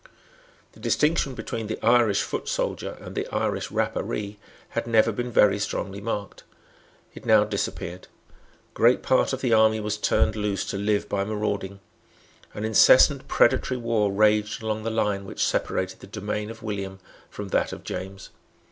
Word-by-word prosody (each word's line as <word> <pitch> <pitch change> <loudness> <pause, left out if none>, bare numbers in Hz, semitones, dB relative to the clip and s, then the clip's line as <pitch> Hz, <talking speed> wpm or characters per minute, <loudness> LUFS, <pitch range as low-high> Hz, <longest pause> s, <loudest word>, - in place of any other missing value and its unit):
The - - -19
distinction 150 -3 +1
between 110 -2 -5
the 110 - -4
Irish 115 -4 +4
foot - - -4
soldier - - -3
and - - -9
the - - -3
Irish - - -2
Rapparee 105 0 -2 0.3
had - - -3
never 115 0 +4
been 120 +3 -4
very 105 -2 +4
strongly 100 -1 -3
marked. 105 -2 -5 0.7
It - - -11
now 110 -1 +5
disappeared. 100 -3 -4 0.7
Great 120 +2 +3
part 130 - +2
of 130 -1 -3
the 125 -3 +1
army 110 0 +4
was 105 0 -2
turned 105 0 +1
loose 105 -2 -2
to - - -3
live 105 0 0
by 100 -1 -1
marauding. 100 -2 -3 0.7
An 105 - -3
incessant 110 -1 +5
predatory 130 - +2
war 115 -4 0
raged 105 +1 +2
along 110 0 -2
the 115 - -2
line 105 -3 0
which 95 - -2
separated 95 0 -1
the - - -12
domain 105 +1 -4
of 115 -1 -10
William 100 -3 -4 0.3
from 105 -1 -7
that - - +1
of - - -8
James. 95 +1 -7
105 Hz, 160 wpm, -25 LUFS, 100-110 Hz, 0.7 s, now